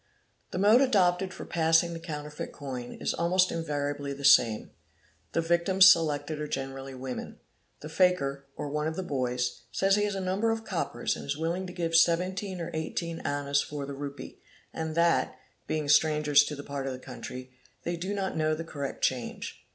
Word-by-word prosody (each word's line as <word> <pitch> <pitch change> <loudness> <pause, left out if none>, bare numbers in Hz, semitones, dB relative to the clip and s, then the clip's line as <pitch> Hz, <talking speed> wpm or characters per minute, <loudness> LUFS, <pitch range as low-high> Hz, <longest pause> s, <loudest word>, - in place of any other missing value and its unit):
"'he - - -3
mode 210 +6 +6
adopted 190 -7 +3
for - - -8
passing 165 +1 +3
the 165 - -6
counterfeit 150 -2 -6
coin 130 -4 -6
is - - -1
almost 180 +2 +2
invar 145 -3 -2
ably 145 -1 -6
the 140 0 -6
same: 115 -5 +5 0.6
the 165 - +2
victims 170 +3 +5
selected 155 -4 +3
are 150 - -3
generally 135 -1 -5
women. 130 0 -6 0.5
~The - - -5
fakir, 155 -6 +1
¢ 145 - -3
one 150 +1 -1
of 160 - -3
the 190 - -3
boys, 125 -5 -2
says 195 +1 +3
he 205 - +2
has 205 -1 -2
a - - -2
number 190 +4 0
of 225 0 -2
coppers 185 -6 -2
and - - -8
is 140 +1 -2
willing 170 +4 -2
to 180 - -8
git 165 -2 -1
17 185 +3 +2
or 170 0 -4
18 165 +1 -3
annas 140 0 0
for 145 -1 -5
the 140 - -6
rupee, 140 0 -8 0.3
and 160 -1 -4
that, 170 0 +2 0.3
being 155 -2 -1
strangers 150 -1 +5
to 150 - -4
the 140 - -8
part 140 -1 -4
of 130 -1 -4
tl - - -20
country, 125 0 -8 0.3
they 175 - -2
do 185 +4 -3
not 195 -1 -2
know 155 0 +1
the 165 - -5
correct 140 -4 -6
change. 125 -2 -2
160 Hz, 190 wpm, -28 LUFS, 140-180 Hz, 0.6 s, mode